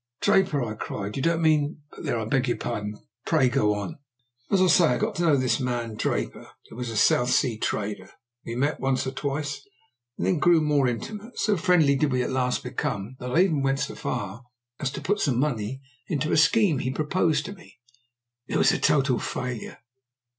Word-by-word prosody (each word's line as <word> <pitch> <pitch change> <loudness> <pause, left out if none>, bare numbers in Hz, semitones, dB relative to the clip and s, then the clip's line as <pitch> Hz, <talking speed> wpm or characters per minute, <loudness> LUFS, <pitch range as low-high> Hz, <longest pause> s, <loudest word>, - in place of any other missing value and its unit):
"Draper!" 190 -9 +2
I 110 -2 -3
cried. 105 -1 -5
"You 135 - -2
don't 165 +2 +1
mean 150 -1 +2
but - - -11
there, 120 - 0
I 110 - -2
beg 130 +4 +1
your 120 - 0
pardon. 105 0 -4 0.3
Pray 145 -6 +3
go 105 -5 +2
on." 100 +5 -5 0.5
"As 195 - +3
I 185 - +5
say, 180 -1 +5
I - - +2
got - - -1
to - - -1
know 160 -5 +4
this 125 -2 +1
man 120 -3 -2
Draper, 105 - -3 0.2
who - - -13
was 125 0 -4
a 115 - -4
South 125 +3 +4
Sea 125 -3 +1
trader. 105 -1 -3 0.3
We 115 - -5
met 145 +4 0
once 135 -1 0
or 130 - -2
twice, 140 +2 -3 0.6
and - - -2
then 175 - +1
grew 175 +1 +5
more 150 -3 +2
intimate. 210 - -5
So 215 -2 +2
friendly 165 -5 +3
did 140 +1 +1
we 125 -1 +1
at - - -3
last 125 -1 0
become, 125 -3 -3
that 125 - -5
I 160 +8 +3
even 160 -7 +1
went 135 0 +1
so - - -2
far 110 -1 -4 0.4
as 140 - -1
to - - -5
put 205 +2 0
some 130 -9 +1
money 130 -2 -2 0.2
into 155 -1 -1
a - - +3
scheme 165 - +4
he 130 - -2
proposed 155 +2 0
to 200 - -6
me. 185 -9 -17 0.7
It - - -1
was - - +5
a - - -1
total 135 -4 +2
failure. 125 -3 -5
135 Hz, 210 wpm, -25 LUFS, 120-155 Hz, 0.7 s, I